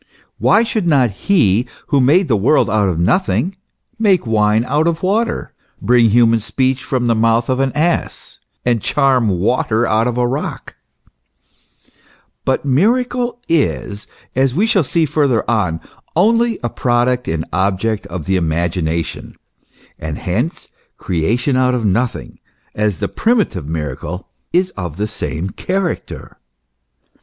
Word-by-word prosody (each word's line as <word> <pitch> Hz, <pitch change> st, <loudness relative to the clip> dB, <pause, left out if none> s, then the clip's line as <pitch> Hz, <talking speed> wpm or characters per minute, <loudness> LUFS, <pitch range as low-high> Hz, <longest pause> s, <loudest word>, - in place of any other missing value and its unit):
Why 225 Hz, -, +4 dB
should 220 Hz, -5 st, -2 dB
not 135 Hz, -8 st, +3 dB
He 120 Hz, -, +2 dB, 0.2 s
who 140 Hz, -, +3 dB
made 165 Hz, +8 st, +4 dB
the 120 Hz, -, +2 dB
world 115 Hz, +9 st, +2 dB
out 105 Hz, -2 st, +2 dB
of 85 Hz, -, -2 dB
nothing, 180 Hz, -, +1 dB, 0.4 s
make 195 Hz, -, +3 dB
wine 110 Hz, 0 st, +2 dB
out 150 Hz, +5 st, +1 dB
of 170 Hz, 0 st, -1 dB
water, 215 Hz, +5 st, -1 dB, 0.3 s
bring 120 Hz, +1 st, +4 dB
human 115 Hz, +1 st, +4 dB
speech 130 Hz, +4 st, -1 dB
from 125 Hz, -2 st, -1 dB
the 120 Hz, -, +3 dB
mouth 115 Hz, +1 st, +2 dB
of 130 Hz, 0 st, +1 dB
an 135 Hz, -1 st, +1 dB
ass, 165 Hz, +3 st, -2 dB, 0.3 s
and 120 Hz, -3 st, +1 dB
charm 135 Hz, -4 st, +2 dB
water 110 Hz, +4 st, +1 dB
out 110 Hz, +1 st, +1 dB
of 120 Hz, -1 st, -2 dB
a 125 Hz, -, +2 dB
rock? 135 Hz, +4 st, -4 dB, 1.7 s
But -, -, 0 dB
miracle 240 Hz, -, +1 dB
is, 120 Hz, -10 st, -1 dB, 0.3 s
as 130 Hz, 0 st, +1 dB
we 200 Hz, +6 st, +3 dB
shall 215 Hz, -6 st, +2 dB
see 165 Hz, +4 st, +1 dB
further 140 Hz, -6 st, +1 dB
on, 95 Hz, -8 st, 0 dB, 0.4 s
only 230 Hz, +5 st, +3 dB
a 120 Hz, -, -1 dB
product 125 Hz, 0 st, 0 dB
and 80 Hz, 0 st, -2 dB
object 100 Hz, +3 st, 0 dB
of 85 Hz, -3 st, -6 dB
the 95 Hz, 0 st, +1 dB
imagination, 85 Hz, -1 st, -2 dB, 0.6 s
and 75 Hz, -1 st, -5 dB
hence 115 Hz, -, -3 dB, 0.3 s
creation 115 Hz, -, 0 dB
out 130 Hz, 0 st, +2 dB
of 120 Hz, -3 st, -2 dB
nothing, 115 Hz, +5 st, -1 dB, 0.3 s
as 105 Hz, -4 st, 0 dB
the -, -, -2 dB
primitive 205 Hz, -, 0 dB
miracle, 80 Hz, +3 st, -5 dB, 0.2 s
is 180 Hz, +2 st, +1 dB
of 90 Hz, -5 st, -6 dB
the 105 Hz, -, -1 dB
same 90 Hz, -2 st, -4 dB
character. 185 Hz, -2 st, -4 dB
120 Hz, 140 wpm, -17 LUFS, 100-155 Hz, 1.7 s, Why